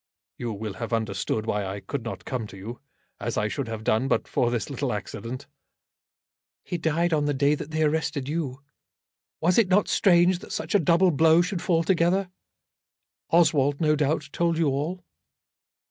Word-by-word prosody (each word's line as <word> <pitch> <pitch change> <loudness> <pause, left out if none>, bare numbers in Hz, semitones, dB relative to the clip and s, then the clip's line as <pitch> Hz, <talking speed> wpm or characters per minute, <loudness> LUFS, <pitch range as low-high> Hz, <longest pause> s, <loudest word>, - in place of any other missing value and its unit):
"You 120 -2 -3
will 105 0 -5
have 115 0 -3
understood 110 0 -1
why 105 -2 -1
I 95 +1 -4
could 110 +8 -5
not 115 - -6
come 125 -5 -3
to 95 - -12
you, 110 +6 -8 0.4
as - - -3
I - - +1
should - - -3
have 110 -1 -5
done 110 +4 +1
but - - 0
for 120 - +1
this 120 -5 -2
little - - -2
accident." 130 +4 -5 1.2
"He 175 - -4
died 165 +1 +1
on 150 -2 +2
the 145 -1 0
day 140 +2 +3
that 150 0 -4
they 155 0 0
arrested 150 -3 0
you. 140 -4 -3 0.8
Was 175 +6 +4
it 225 - +4
not 195 +3 +3
strange 175 -1 +4
that - - -11
such - - -3
a 205 - +5
double 170 +3 +4
blow 160 +2 +5
should 180 -1 -3
fall 165 -3 +2
together? 180 +2 +1 1.0
Oswald, 145 -4 +3
no 155 -1 +3
doubt, 150 0 0
told 170 -1 0
you 160 -3 +2
all." 155 +7 -3
150 Hz, 180 wpm, -25 LUFS, 120-170 Hz, 1.2 s, a